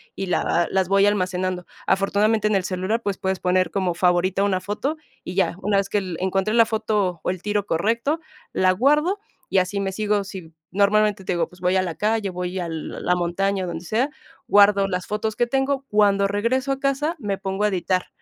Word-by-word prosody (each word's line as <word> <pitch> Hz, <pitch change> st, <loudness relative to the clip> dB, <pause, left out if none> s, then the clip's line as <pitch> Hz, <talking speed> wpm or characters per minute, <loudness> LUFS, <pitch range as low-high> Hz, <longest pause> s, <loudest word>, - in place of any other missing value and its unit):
y 195 Hz, -, -3 dB
la 180 Hz, -, +1 dB
v 170 Hz, 0 st, +1 dB
las 190 Hz, -1 st, +1 dB
voy 195 Hz, 0 st, +4 dB
almacenando. 185 Hz, -2 st, 0 dB, 0.2 s
Afortunadamente, 210 Hz, +3 st, +2 dB
en 210 Hz, -, +1 dB
el 190 Hz, -, +1 dB
celular, 190 Hz, +5 st, -1 dB
pues 200 Hz, -2 st, -2 dB
puedes 190 Hz, -1 st, -2 dB
poner 185 Hz, 0 st, +2 dB
como 185 Hz, -3 st, 0 dB
favorita 180 Hz, +2 st, +2 dB
una 190 Hz, -2 st, +1 dB
foto 235 Hz, +11 st, -3 dB, 0.3 s
y 180 Hz, -, -6 dB
ya. 190 Hz, -3 st, +1 dB
Una 200 Hz, +1 st, +1 dB
vez 195 Hz, 0 st, 0 dB
que 205 Hz, -, +1 dB, 0.2 s
encontré 190 Hz, +3 st, 0 dB
la 230 Hz, -1 st, +6 dB
foto 210 Hz, -5 st, -1 dB
o -, -, -1 dB
el 185 Hz, -1 st, -3 dB
tiro 205 Hz, -1 st, 0 dB
correcto, 230 Hz, -, 0 dB, 0.3 s
la 185 Hz, 0 st, +3 dB
guardo 300 Hz, -, +2 dB, 0.3 s
y 190 Hz, -, +3 dB
así 185 Hz, +2 st, -1 dB
me 195 Hz, -1 st, -1 dB
sigo, 210 Hz, -1 st, 0 dB
sí, 185 Hz, -5 st, -9 dB, 0.2 s
normalmente 205 Hz, +1 st, +2 dB
te 180 Hz, -, -1 dB
digo, 170 Hz, -1 st, 0 dB
pues 180 Hz, 0 st, -18 dB
voy 180 Hz, +1 st, +2 dB
a -, -, +3 dB
la 170 Hz, -3 st, -4 dB
calle, 215 Hz, -1 st, 0 dB
voy 180 Hz, +1 st, -4 dB
a 175 Hz, -, -3 dB
la 165 Hz, +2 st, -2 dB
montaña, 185 Hz, +2 st, -1 dB
donde 170 Hz, 0 st, -6 dB
sea, 240 Hz, -, 0 dB, 0.4 s
guardo 200 Hz, -1 st, +5 dB
las 180 Hz, -2 st, -3 dB
fotos 215 Hz, +1 st, -2 dB
que 240 Hz, -, +1 dB
tengo. 270 Hz, +1 st, 0 dB
Cuando 200 Hz, -1 st, +3 dB
regreso 245 Hz, +7 st, 0 dB
a 270 Hz, -, -6 dB
casa, 280 Hz, +4 st, 0 dB
me 200 Hz, -4 st, -2 dB
pongo 195 Hz, +1 st, -3 dB
a -, -, +3 dB
editar, 185 Hz, -1 st, -1 dB
195 Hz, 210 wpm, -23 LUFS, 185-215 Hz, 0.4 s, la